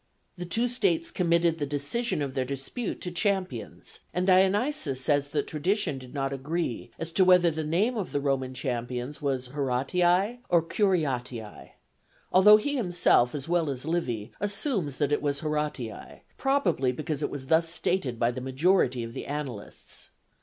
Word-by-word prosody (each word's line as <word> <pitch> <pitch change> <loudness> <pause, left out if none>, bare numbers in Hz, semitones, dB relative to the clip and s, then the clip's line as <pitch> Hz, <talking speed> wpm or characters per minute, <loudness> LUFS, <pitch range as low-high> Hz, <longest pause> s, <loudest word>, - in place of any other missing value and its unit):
The 175 -1 -6
two 230 +8 +1
states 335 +6 +1
committed 170 -2 +2
the 145 - -1
decision 145 - -1
of 135 -2 -4
their 130 -1 0
dispute 140 - -4
to 180 - -4
champions, 180 - -2 0.2
and 180 +1 +1
Dionysius 190 - +2
says 145 +1 +1
that 145 0 -1
tradition 160 -1 -1
did 130 -1 -12
not 135 -1 -2
agree 135 -3 -3
as 165 0 -4
to 185 +3 +4
whether 180 -2 +5
the 160 0 -3
name 190 +11 +1
of 205 -5 -3
the 145 - 0
Roman 135 -2 -1
champions 125 +2 -4
was 130 -3 -2
Horatii 175 - +1
or 170 -2 +4
Curiatii, 135 - -2 0.6
although 210 +3 +8
he 285 +6 -2
himself, 175 - +3
as 140 0 -4
well 170 -3 +1
as 135 0 -4
Livy, 125 -11 -2
assumes 200 - 0
that 145 0 0
it 145 - +1
was 140 -1 -1
Horatii, 150 -6 -4
probably 270 - +1
because 150 +2 -4
it - - -1
was 140 -2 -6
thus 165 +3 +2
stated 165 -7 -1
by 115 +1 +2
the 130 +1 -6
majority 130 -1 +2
of 115 0 -7
the - - -6
annalists. 135 -8 -7
150 Hz, 165 wpm, -27 LUFS, 130-185 Hz, 0.6 s, although